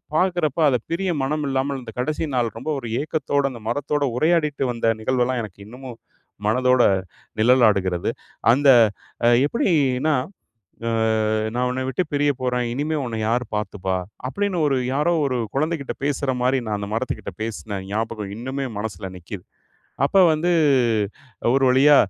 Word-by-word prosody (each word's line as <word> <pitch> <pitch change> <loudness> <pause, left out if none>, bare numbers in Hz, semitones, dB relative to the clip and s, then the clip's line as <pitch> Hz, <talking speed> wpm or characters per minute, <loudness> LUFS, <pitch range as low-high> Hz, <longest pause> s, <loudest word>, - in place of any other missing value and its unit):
பாக்குறப்ப 175 -4 +1
அத 130 - +2
பிரிய 185 +2 0
மனம் 150 +2 -1
இல்லாமல் 135 +1 -1
அந்த 120 -2 -9
கடைசி 150 +5 -1
நாள் 120 -4 0
ரொம்ப 130 +7 -5
ஒரு 120 -3 -7
ஏக்கத்தோட, 145 -2 -1
அந்த 120 -3 -10
மரத்தோட 145 +3 -1
உரையாடிட்டு 150 -2 +2
வந்த 115 -1 +1
நிகழ்வெல்லாம், 125 +1 0
எனக்கு 100 -2 -10
இன்னமும் 125 +1 -10 0.5
மனதோட 125 +3 +3 0.6
நிழலாடுகிறது. 105 -7 +3 0.4
அந்த 140 +3 +4 0.6
அ - - +6 0.2
எப்புடி 235 - 0 0.3
இன்னா? 155 +3 +2 1.2
அ - - 0 0.2
"நான் 125 +1 +1
உன்ன 130 +1 -2
விட்டு 135 - 0
பிரியப்போறேன், 130 -4 0
இனிமே 150 +4 -1
உன்ன 115 -2 -4
யார் 120 +2 +1
பாத்துப்பா?" 95 -3 -2 0.3
அப்டின்னு 185 +5 -1
ஒரு 135 -2 +1 0.2
யாரோ 150 +5 +2
ஒரு 130 -2 -1 0.2
குழந்தைகிட்ட 155 -1 -1
பேசுற 140 -1 0
மாரி 130 +1 +2
நான் 105 -1 -1
அந்த 100 - -4
மரத்துகிட்ட 110 -4 -3
பேசின 110 -2 -4
ஞாபகம் 105 -1 -3
இன்னுமே 130 +4 -4
என் 105 - -6
மனசுல 95 -3 -5
நிக்குது. 90 +1 -9 0.6
அப்ப 170 - +1 0.2
வந்து 165 +3 0 1.0
ஒரு 135 0 +3
வழியா 140 +3 +6
130 Hz, 145 wpm, -22 LUFS, 115-145 Hz, 1.2 s, அ